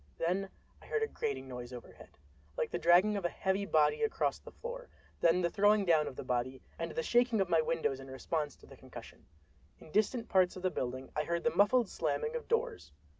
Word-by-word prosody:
—Then 185 +4 -1 0.3
I - - -15
heard 445 0 0
a - - +1
grating 175 - -4
noise 125 -1 -7
overhead, 125 -1 -12 0.4
like - - -1
the - - -2
dragging 185 +5 +5
of 195 - -4
a 175 - +1
heavy 195 +2 -1
body 155 - +3
across 445 - 0
the - - -12
floor; - - -8 0.3
then 170 +2 +4
the 170 - +1
throwing 205 0 +4
down 160 -4 +3
of - - -6
the - - -6
body, 125 +1 -2 0.2
and 165 0 -2
the 160 0 -3
shaking 240 0 +3
of 190 -2 +1
my 165 -2 +4
windows 155 -4 -1
in 135 0 -10
response 145 +2 -3
to - - -18
the - - -14
concussion. - - -12 0.5
In 155 - -15
distant 225 +4 +1
parts 185 -2 +3
of 185 - -9
the 185 - +1
building 130 -1 -4
I 150 - +1
heard 170 0 -1
the 235 - +1
muffled 220 +3 +4
slamming 460 - -2
of 480 - -5
doors. 465 -1 -1
180 Hz, 220 wpm, -33 LUFS, 150-215 Hz, 0.5 s, dragging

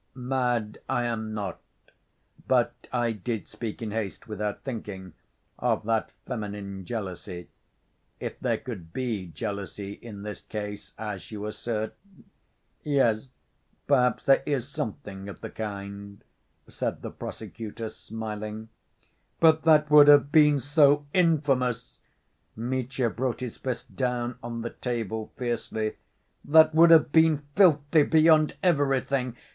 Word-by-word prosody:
"Mad 125 -4 -1
I 120 - +1
am 110 -2 -2
not, 100 -4 -4 0.9
but - - +3 0.2
I 120 -2 +1
did 110 0 -4
speak 115 -1 -6
in 110 - -3
haste, 105 -3 -4
without 105 -1 -4
thinking... 100 - -6 0.5
of 115 -3 +1
that 110 0 0
feminine 100 -5 -5
jealousy... 95 -4 -6 0.7
if - - -5
there - - 0
could 90 -10 -8
be 115 -8 -2
jealousy 100 +4 -5
in 105 -2 -10
this 105 -1 -6
case, 105 -1 -6
as 105 -4 -6
you 105 -1 -6
assert... 110 0 -3 0.9
yes, 135 -4 +1 0.6
perhaps 125 -4 +3
there 135 - +5
is 140 -4 0
something 100 -7 -5
of 100 - -10
the - - -6
kind," 100 -1 -7 0.4
said - - -4
the - - -5
prosecutor, 115 0 -7
smiling. 110 0 -6 0.7
"But 160 -1 +5
that 150 -2 +5
would 150 -1 +9
have 145 -1 +7
been 150 -2 +6
so 145 +1 +4
infamous!" 135 -8 +1 0.6
Mitya 125 +1 -1
brought 125 +2 -2
his 125 -3 -5
fist 130 -2 -5
down 125 -2 -1
on 115 0 -5
the 120 - -4
table 110 -3 -4
fiercely. 110 -3 -2 0.5
"That 155 +1 +6
would 165 +2 +7
have 160 -3 +6
been 160 -2 +4
filthy 155 -5 +5
beyond 155 0 +5
everything! 135 -6 +1
120 Hz, 125 wpm, -27 LUFS, 105-140 Hz, 0.9 s, would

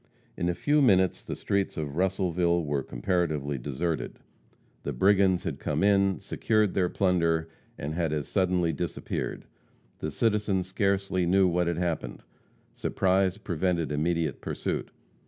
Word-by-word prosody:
In 85 - -1
a 90 - 0
few 150 +7 +2
minutes 95 -8 +3
the - - -5
streets 100 -1 -1
of 75 -2 -4
Russellville 90 -2 +1
were 70 -1 0
comparatively 75 +1 -1
deserted. 75 +6 -3 0.6
The 70 - -4
brigands 95 +4 +3
had - - -4
come - - -1
in, 100 -1 +3
secured 110 -3 +1
their 90 -2 +1
plunder, 85 -4 +1 0.3
and 75 +2 -4
had 80 -2 -1
as 75 -3 -2
suddenly 90 -3 +1
disappeared; 70 - -4 0.5
the - - -3
citizens 105 -4 +1
scarcely 95 -1 0
knew 95 +1 +4
what 90 0 +1
had 85 -1 -1
happened. 85 -3 -3 0.5
Surprise 95 0 +1
prevented 85 -4 -1
immediate 80 0 -1
pursuit. - - -3
90 Hz, 140 wpm, -28 LUFS, 80-95 Hz, 0.6 s, knew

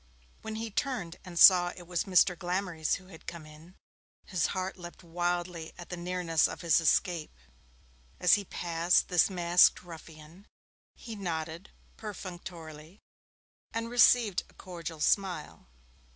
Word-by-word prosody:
When 220 0 -6
he 225 0 -5
turned 210 -9 -3
and 180 -2 -9
saw 180 -1 +8
it 175 - -11
was 175 -1 -2
Mr. 185 -2 +4
Glamorys 175 -2 -2
who 185 -1 -12
had 165 -4 -15
come 170 -2 -7
in, 155 +4 -15 0.5
his 185 -4 0
heart 190 0 -3
leapt 175 0 -11
wildly 175 -1 -3
at 175 - -11
the 180 - -4
nearness 175 -2 0
of - - -8
his 170 -1 +3
escape. 165 - 0 0.8
As 180 - +5
he 205 - +3
passed 170 0 +1
this 180 +1 +4
masked 175 -1 +4
ruffian, 165 +2 -13 0.5
he 230 -2 -9
nodded 170 -2 -5 0.3
perfunctorily 175 -4 -9 0.8
and 230 +1 -3
received 240 -4 +4
a - - -22
cordial 170 -3 -8
smile. 180 - -1
175 Hz, 135 wpm, -29 LUFS, 165-190 Hz, 0.8 s, saw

